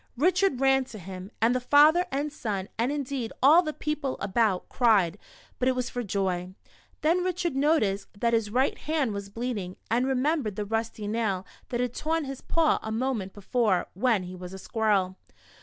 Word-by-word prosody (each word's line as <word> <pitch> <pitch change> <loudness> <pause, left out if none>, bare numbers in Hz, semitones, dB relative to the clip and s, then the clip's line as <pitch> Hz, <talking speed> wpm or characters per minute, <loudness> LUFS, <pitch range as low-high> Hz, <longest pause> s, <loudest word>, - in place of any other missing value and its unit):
Richard 365 -1 +2
ran 270 0 +4
to 235 -4 -10
him, 185 0 -8
and 230 +2 +4
the 255 - +1
father 300 +7 +5
and 285 +2 -2
son, 200 -8 -3
and 235 +4 0
indeed 275 -5 -3
all 310 +6 +8
the 310 -4 -3
people 300 -3 -3
about, 200 -1 +1
cried, 205 -7 +3 0.4
but 250 - +1
it 260 - +3
was 250 -1 -2
for 245 - -3
joy. 185 -3 -2 0.5
Then 340 +4 +2
Richard 355 -4 -1
noticed 270 -9 +2
that 235 +1 +1
his 225 -2 +1
right 255 +5 +1
hand 295 -7 -1
was 200 0 -5
bleeding, 210 -5 -4 0.2
and 245 +3 +2
remembered 265 -4 0
the 210 - -3
rusty 225 0 -3
nail 205 -4 -1 0.2
that 240 - -2
had 250 -1 -1
torn 320 +2 -1
his 270 -1 -6
paw 330 -2 +2
a 220 - -5
moment 225 -4 -1
before, 205 -1 0
when 215 0 +1
he 180 +1 -7
was 180 0 -8
a - - -6
squirrel. 195 -3 0
235 Hz, 185 wpm, -27 LUFS, 200-275 Hz, 0.5 s, all